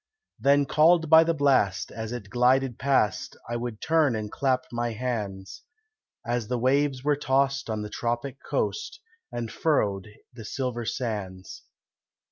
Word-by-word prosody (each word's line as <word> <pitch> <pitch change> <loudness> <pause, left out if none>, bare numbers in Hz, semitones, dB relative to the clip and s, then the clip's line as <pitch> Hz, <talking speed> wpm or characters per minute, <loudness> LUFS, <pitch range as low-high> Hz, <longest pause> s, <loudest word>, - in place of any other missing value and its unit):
Then 140 +1 +4
called 160 +3 +4
by 160 0 +9
the 165 0 0
blast, 130 - +2
as 110 0 -6
it 110 -5 -7
glided 125 +1 +2
past, 105 -9 +1
I 120 - -3
would 120 -2 -4
turn 160 -6 +2
and 105 -1 -4
clap 130 -2 0
my 120 -1 -2
hands, 105 - -4 0.6
As 120 -2 -1
the 125 - -1
waves 135 +2 +1
were 145 0 +2
tossed 135 -2 0
on 110 -1 -2
the 105 - -6
tropic 120 +3 -3
coast, 430 - -2 0.3
And 115 -2 -4
furrowed 105 - 0 0.3
the 120 -2 -10
silver 120 +1 -3
sands. 105 -7 -5
125 Hz, 145 wpm, -26 LUFS, 110-140 Hz, 0.6 s, by